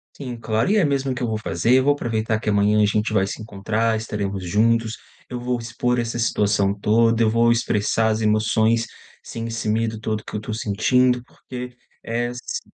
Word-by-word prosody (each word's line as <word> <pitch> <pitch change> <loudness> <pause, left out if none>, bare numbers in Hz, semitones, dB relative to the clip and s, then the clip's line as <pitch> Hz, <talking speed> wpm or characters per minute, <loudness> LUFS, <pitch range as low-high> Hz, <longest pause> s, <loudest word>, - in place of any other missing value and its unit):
Sim, 125 -4 -6
claro, 110 +2 0
e 210 - +3
é 210 - +4
mesmo 135 -3 0
que 125 - -4
eu - - 0
vou 110 -1 -1
fazer. 105 +4 +1
Eu 130 +1 +3
vou 145 - +5
aproveitar 110 -5 -1
que 110 - -2
amanhã 105 +1 +3
a - - +5
gente 105 +1 0
vai 95 -3 +3
se 100 - -6
encontrar. 110 +2 -1
Estaremos 100 -3 -3
juntos. 115 +4 +1 0.3
Eu 125 - -5
vou 125 0 -1
expor 120 +1 -1
essa 115 0 -2
situação 100 -3 +1
toda. 115 +2 +3
Eu 110 - +3
vou 115 +1 +3
expressar 110 -1 +1
as 110 0 0
emoções 110 +1 +2 0.4
sem 115 0 -6
esse 115 -1 -3
medo 110 0 0
todo 110 -1 -2
que - - -10
eu - - 0
estou 105 +1 -6
sentindo, 125 +4 +1
porque 125 0 -9 0.3
é 120 +1 -2
se 470 - -5
115 Hz, 200 wpm, -22 LUFS, 105-120 Hz, 0.4 s, vou